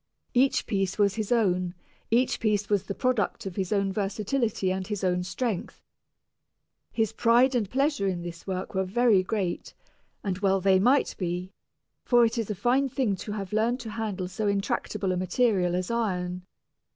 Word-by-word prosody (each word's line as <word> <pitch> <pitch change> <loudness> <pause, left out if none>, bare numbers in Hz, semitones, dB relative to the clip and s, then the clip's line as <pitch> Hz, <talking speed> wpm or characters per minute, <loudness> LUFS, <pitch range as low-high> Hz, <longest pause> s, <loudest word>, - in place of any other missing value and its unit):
Each 260 +2 +3
piece 195 -2 -1
was 200 -2 +3
his 215 -1 -4
own, 185 -6 +1 0.3
each 240 +3 +2
piece 210 -2 0
was 200 -2 +1
the 200 - -4
product 255 -7 0
of 190 -2 -5
his 190 -2 -2
own 200 -2 +1
versatility 210 0 -1
and 190 0 -3
his 205 -2 -4
own 180 -1 +1
strength. 195 +2 -3 1.1
His 225 -2 0
pride 240 +4 +4
and 225 -6 0
pleasure 275 -4 +1
in 175 -2 -2
this 170 +1 -8
work 185 -1 -4
were 190 0 +1
very 215 +1 +3
great, 185 -2 -3 0.5
and 190 -2 -2
well 195 -1 +2
they 190 0 +4
might 255 +8 +3
be, 180 0 -3 0.5
for 240 -1 +5
it 230 +1 -1
is 225 - -2
a 210 - -2
fine 250 +7 +2
thing 240 -6 0
to 210 - -6
have 200 -2 -5
learned 230 +4 +1
to 225 -3 -7
handle 210 -5 -3
so 195 +3 -3
intractable 200 0 -1
a 180 - 0
material 185 -1 +1
as 180 +4 -2
iron. 180 -5 -2
200 Hz, 175 wpm, -27 LUFS, 185-230 Hz, 1.1 s, for